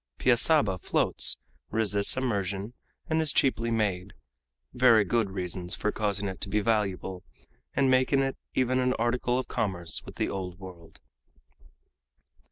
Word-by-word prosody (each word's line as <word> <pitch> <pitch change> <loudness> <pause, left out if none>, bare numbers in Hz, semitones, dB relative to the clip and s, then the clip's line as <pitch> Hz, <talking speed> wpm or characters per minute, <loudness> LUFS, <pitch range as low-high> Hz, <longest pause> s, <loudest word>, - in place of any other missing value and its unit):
Piaçaba 120 - +3
floats, - - +1 0.3
resists 105 0 +2
immersion, 100 -4 -2 0.3
and 160 0 +1
is 155 -3 +3
cheaply 115 -5 +1
made 100 -4 -1 0.6
very 125 -4 +5
good 110 +1 +1
reasons 90 -1 -3
for 105 - -1
causing 105 -2 -1
it 95 -1 -6
to 100 - -3
be 105 - +1
valuable, 100 -3 -1 0.5
and 140 - +3
making 130 +1 +3
it 135 0 -2 0.2
even 130 0 +2
an 125 0 +2
article 120 +1 0
of 130 - -3
commerce 90 -8 -1
with - - -11
the - - -1
Old 90 -2 -5
World. 90 -4 -12
105 Hz, 140 wpm, -28 LUFS, 95-125 Hz, 0.6 s, very